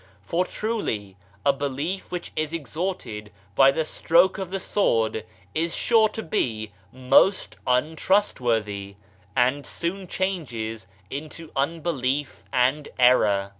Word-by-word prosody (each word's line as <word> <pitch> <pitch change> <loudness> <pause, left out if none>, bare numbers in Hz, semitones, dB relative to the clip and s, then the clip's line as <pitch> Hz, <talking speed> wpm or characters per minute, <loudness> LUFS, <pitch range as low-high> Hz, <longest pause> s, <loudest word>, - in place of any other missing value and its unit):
For 170 - 0
truly 150 - -3 0.3
a 140 - +5
belief 145 +7 -3
which 175 -1 -4
is 155 0 -1
extorted 150 - -4 0.2
by 135 +5 +7
the 155 +3 -1
stroke 175 +5 +3
of 190 -2 -4
the 195 +1 -2
sword 110 - +1 0.3
is 165 +1 0
sure 225 -2 +4
to 220 +1 -6
be 110 -8 -1 0.2
most 130 +9 +3
untrustworthy, 125 - +1 0.4
and 130 +3 +2
soon 185 +5 -4
changes 120 - -3 0.2
into 155 +3 -7
unbelief 145 -2 -1
and 130 +4 +2
error. 105 -6 +4
145 Hz, 115 wpm, -25 LUFS, 115-175 Hz, 0.4 s, by